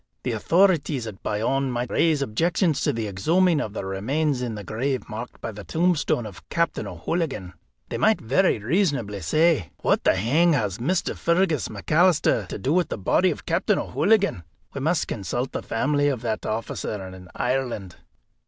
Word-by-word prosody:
"The 125 - -1
authorities 160 - +2
at 105 -4 -8
Bayonne 130 +6 0
might 120 0 -3
raise 155 -4 +2
objections 165 - +1
to 145 - +2
the 115 -4 -3
exhuming 160 - +2
of 105 - -5
the 100 - -4
remains 130 +9 -1
in 120 -3 -3
the 105 - -7
grave 130 +7 -2
marked 115 +2 -7
by 115 - -4
the 105 -1 -9
tombstone 160 - +1
of 100 -5 -11
Captain 170 -1 -1
O'Hooligan. 135 - -3 0.4
They - - -3
might 220 0 +3
very 140 +11 +2
reasonably 120 - 0
say: 155 - +2
'What - - +2
the - - +4
hang 150 - +3
has 105 -8 -1
Mr. 175 +9 0
Fergus 170 -4 +1
McAlister 150 - +2
to - - -5
do 130 +9 0
with 180 0 +2
the - - -3
body 180 - +2
of 160 - -5
Captain - - +1
O'Hooligan?' 200 - +1 0.3
We 140 - -4
must 160 +3 +1
consult 120 +5 -3
the - - -3
family 145 +5 0
of 135 -5 -1
that 110 -2 -2
officer 110 -1 -3
in 95 -1 -11
Ireland." 125 -8 -2
135 Hz, 170 wpm, -24 LUFS, 110-165 Hz, 0.4 s, the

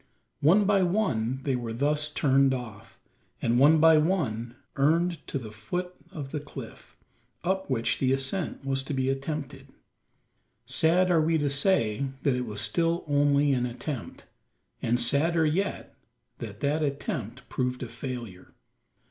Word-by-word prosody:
One 190 +8 +5
by 200 -1 +3
one 135 - 0
they 135 -2 0
were 120 -2 -4
thus 150 +4 0
turned 135 -2 +3
off; 110 -3 -9 0.4
and 120 +1 +1
one 150 +4 +6
by 160 0 +7
one 125 - -1 0.2
earned 165 +5 +2
to - - -2
the 115 -5 -7
foot 180 +12 -4 0.2
of 145 -7 -7
the 150 - -2
cliff, 145 0 -11 0.5
up 190 0 -1
which 115 -3 0
the 130 -1 +2
ascent 135 +3 -2
was 135 0 0
to 145 - -3
be 130 0 0
attempted. 135 0 -4 1.0
Sad 180 +3 +3
are 165 -2 +4
we 160 +1 +2
to 145 -2 0
say 140 - +2 0.2
that 135 -3 +2
it 125 -1 -3
was 105 -1 -2
still 170 +8 +1
only 145 -1 +3
an 125 -1 0
attempt; 125 +1 -6 0.6
and 120 +1 +1
sadder 155 +7 +2
yet 185 +6 -2 0.4
that - - -8
that 150 +3 +1
attempt 130 -4 -3
proved 125 0 -2
a - - -4
failure. 115 -5 -7
140 Hz, 150 wpm, -27 LUFS, 125-160 Hz, 1.0 s, by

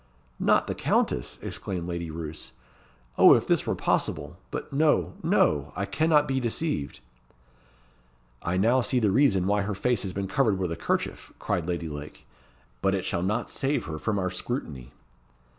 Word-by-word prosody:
"Not - - +3
the - - -2
Countess!" - - 0
exclaimed 90 -2 -4
Lady 85 -1 -4
Roos. 80 -1 -7 0.7
"Oh, - - +9
if - - 0
this - - +1
were - - +1
possible! - - -1
But - - -6
no, 150 +2 +2
no! 75 0 +2
I 100 - -1
cannot 150 +8 +3
be 135 0 0
deceived." 120 - -2 1.4
"I 90 +2 -1
now 120 +7 +4
see 125 - 0
the 110 -5 +3
reason 100 -6 +3
why 100 +1 +2
her 100 0 -2
face 120 +2 +1
has 95 - -3
been 95 +1 -3
covered 110 -4 +2
with 90 -3 -2
a - - -2
'kerchief," 85 - -2
cried 85 -2 -2
Lady 85 -2 -2
Lake. 75 0 -8 0.6
"But 95 0 +2
it 95 - -3
shall 85 - -1
not 105 +6 -1
save 140 +1 -1
her 80 -1 -5
from 110 +3 -1
our 95 -2 -1
scrutiny." 80 - -5
95 Hz, 170 wpm, -27 LUFS, 85-125 Hz, 1.4 s, Oh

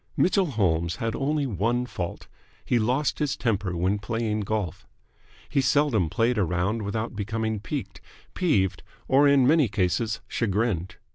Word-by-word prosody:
Mitchell 190 0 +3
Holmes 85 - 0
had 115 +2 -2
only 145 +1 0
one 120 +2 0
fault. 90 -7 -6 0.4
He 120 - +2
lost 130 +6 0
his 150 -3 0
temper 100 -7 -1
when 95 +4 +1
playing 110 0 -2
golf. 105 -5 -3 0.6
He 140 - +1
seldom 130 - +2
played 115 +5 +1
a - - +3
round 90 +6 -1
without 110 +2 -3
becoming 110 +1 -2
piqued, 135 +6 -5 0.3
peeved, 135 - +1 0.3
or 140 +2 +5
in 140 -2 +5
many 150 0 +4
cases 105 +2 0
chagrined. 100 -5 -1
110 Hz, 145 wpm, -26 LUFS, 100-130 Hz, 0.6 s, or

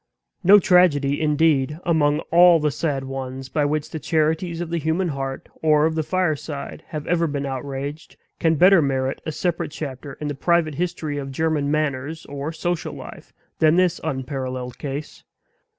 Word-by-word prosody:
No 200 +4 +8
tragedy, 160 -7 +3
indeed, 150 -2 +2
among 155 -3 +2
all 175 0 +7
the 150 -1 +1
sad 140 -3 -2
ones 135 0 -6
by 150 0 +1
which 150 +1 -2
the 160 - -4
charities 160 +3 0
of 170 -1 -4
the 170 - 0
human 160 +4 0
heart 135 -2 -4
or 155 -1 +4
of 160 - +1
the 160 - 0
fireside 155 -4 -2
have 150 -1 -6
ever 170 -1 +1
been 140 -2 -3
outraged, 140 +3 -5 0.2
can 165 -1 +3
better 180 +3 +6
merit 135 -1 -1
a - - -1
separate 170 +2 -2
chapter 145 -2 -7
in 150 - -6
the 145 - -2
private 165 +2 +1
history 160 -2 -3
of 135 -1 -6
German 155 0 0
manners 155 +1 -2
or 140 +2 -5
social 175 +1 -3
life - - -11 0.3
than 155 0 +5
this 180 -1 +2
unparalleled 130 -2 -4
case. 145 +1 -6
150 Hz, 165 wpm, -22 LUFS, 140-165 Hz, 0.3 s, No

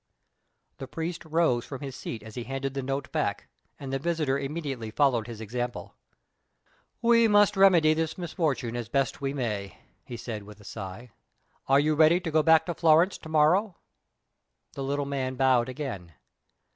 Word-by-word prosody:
The 135 - -6
priest 165 +4 -5
rose 160 -7 +1
from 135 -1 -8
his 135 -3 -6
seat 110 -4 -6
as 110 0 -11
he 120 0 -6
handed 135 +1 -4
the 135 - -3
note 135 0 -4
back, - - -2 0.3
and 135 -1 -6
the 135 - 0
visitor 155 -3 0
immediately 140 -5 -4
followed 120 -2 +1
his 115 -3 -8
example. 120 +3 -5 1.1
"We 230 -1 +5
must 205 -1 +4
remedy 180 -5 +5
this 160 0 -2
misfortune 155 - -2
as 120 -2 -4
we - - -32
best 135 0 0
may," 120 -8 -3 0.3
he 120 - -8
said, 115 -2 -6
with 105 +1 -13
a - - -15
sigh. 105 +4 -8 0.6
"Are 135 +1 +5
you 155 +2 +2
ready 160 +3 +5
to 170 -3 -5
go 155 0 +4
back 160 0 +5
to 175 - -2
Florence 165 +3 +3
to 160 - -11
morrow?" 170 +6 +3 1.0
The 135 - -5
little 140 +1 -1
man 130 -2 -3
bowed 130 -2 +3
again. 120 - -6
135 Hz, 170 wpm, -27 LUFS, 120-160 Hz, 1.1 s, We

